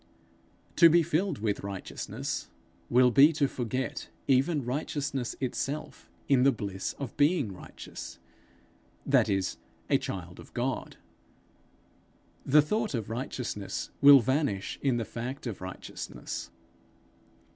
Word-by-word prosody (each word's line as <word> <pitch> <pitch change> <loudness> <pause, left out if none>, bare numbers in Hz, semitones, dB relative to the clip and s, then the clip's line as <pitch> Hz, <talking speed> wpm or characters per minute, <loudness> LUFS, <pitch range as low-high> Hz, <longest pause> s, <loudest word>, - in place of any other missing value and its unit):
To 170 - +9
be 170 +1 +5
filled 180 +6 0
with 105 -1 -1
righteousness, 100 -1 -5 0.4
will 125 0 +5
be 140 +5 +7
to 145 -2 +2
forget 130 +1 -3 0.2
even 135 +1 +2
righteousness 135 -1 -2
itself 135 +3 -4 0.2
in 135 -3 +4
the 135 +2 +6
bliss 100 -6 -4
of 135 -6 -6
being 145 - +2
righteous, 90 - -9 0.9
that - - +4
is, 95 -2 0 0.3
a - - +5
child 90 -2 -6
of - - -14
God. 130 +1 -2 1.5
The 150 +2 +5
thought 215 - -1
of 110 -2 -4
righteousness 115 -4 -4
will 140 -1 +10
vanish 130 -6 -1
in 130 -4 +2
the 115 - -2
fact 125 +6 -6
of 115 -6 -5
righteousness. 95 0 -6
130 Hz, 120 wpm, -29 LUFS, 110-145 Hz, 1.5 s, will